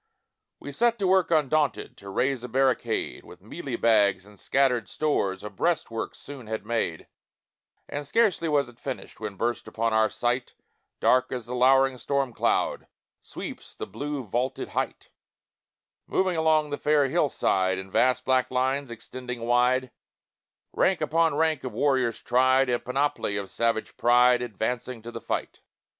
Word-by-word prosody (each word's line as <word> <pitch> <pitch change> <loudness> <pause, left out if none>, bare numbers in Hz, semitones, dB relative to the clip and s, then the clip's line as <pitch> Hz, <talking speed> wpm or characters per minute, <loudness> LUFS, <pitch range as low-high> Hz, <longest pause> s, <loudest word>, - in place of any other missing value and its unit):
We - - -8
set 235 0 +2
to 200 - -1
work 190 -1 +3
undaunted 150 -5 +1
To 100 -3 -10
raise 130 +5 0
a 125 - -6
barricade, 125 -2 0
With - - -15
mealie - - -5
bags 105 -4 +3
and 105 -1 -17
scattered 125 -7 +1
stores 100 -11 -1
A 105 - -5
breastwork 140 -9 -2
soon 135 -5 -10
had 110 -1 -4
made; 110 -8 -2 0.8
And 145 0 -5
scarcely 190 -3 +2
was 145 -3 +2
it 120 -1 -16
finished, 135 -2 -7
When 105 -2 -5
burst 120 +4 -2
upon 115 0 -1
our 110 0 +3
sight, 120 +1 -2 0.4
Dark 130 0 +3
as 125 -3 -4
the 120 - -6
lowering 130 +1 +4
storm 140 -3 -1
cloud - - 0 0.3
Sweeps - - -8
the - - -5
blue 145 -1 -5
vaulted 120 +4 -2
height, - - -4 1.0
Moving 185 -2 +1
along 155 -2 +2
the 145 - -3
fair 150 -2 +3
hill 150 +1 +1
side, 95 -5 +1
In 95 0 -7
vast 125 +3 +2
black 130 -1 +2
lines 130 +2 0
extending 125 +1 -7
wide, 125 +2 +2 0.8
Rank 190 -2 +2
upon 160 0 +2
rank 160 -2 +1
of 130 -3 -5
warriors 130 -1 +1
tried, 130 +1 +3
In 120 -1 +1
panoply 125 -5 -1
of 100 -1 -5
savage 115 -1 -1
pride 125 +1 +5
Advancing 120 +1 -3
to 120 - -7
the - - -7
fight. - - -4
125 Hz, 155 wpm, -26 LUFS, 115-145 Hz, 1.0 s, pride